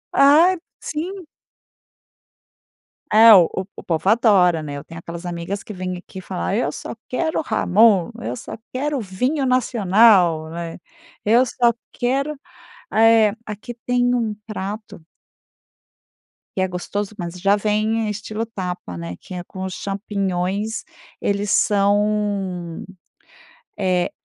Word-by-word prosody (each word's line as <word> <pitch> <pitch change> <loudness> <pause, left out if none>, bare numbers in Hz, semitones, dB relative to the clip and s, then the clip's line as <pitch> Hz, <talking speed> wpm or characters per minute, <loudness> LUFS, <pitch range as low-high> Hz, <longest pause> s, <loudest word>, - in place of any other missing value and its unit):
Ah, 305 +7 +6 0.2
sim. 360 +4 -5 1.9
É 225 +1 +9
o 180 -5 +7 0.3
o - - -10
povo 165 +2 0
adora 195 -7 +4
né? 145 -1 -6
Eu 140 - -8
tenho 165 - -10
aquelas 170 +1 -8
amigas 175 +3 -4
que 215 - -8
vêm 185 -1 -4
aqui 185 +1 -10
falar: 85 - -3
"Eu 140 - 0
só - - -7
quero 315 +6 -1
jamón, 200 -1 +4
eu - - -3
só 240 - -8 0.2
quero 285 +2 -1
vinho 250 +9 -1
nacional, 205 -9 +4
né, 165 0 -6 0.5
eu 235 +5 +5
só 240 -1 +2 0.2
quero, 275 +4 -1 0.5
ah 220 - +1
eh 225 -2 +6
aqui 210 +3 -7
tem 245 0 +2
um 225 -3 -1
prato 205 -4 -6 1.5
que - - +2
é 185 - +2
gostoso, 195 +3 -4
mas 170 -3 -5
já 200 +2 +4
vem 215 +2 0
estilo 215 +2 -4
tapa, 180 - -6
né, 85 +1 -6
que - - -11
é 180 -1 -5
com 190 +1 -7
os 190 - -5
champignons 200 +1 -2 0.4
eles 200 0 -1
são, 200 -3 +1 1.0
eh, 185 -2 +1
a - - -15
205 Hz, 130 wpm, -21 LUFS, 180-230 Hz, 1.9 s, É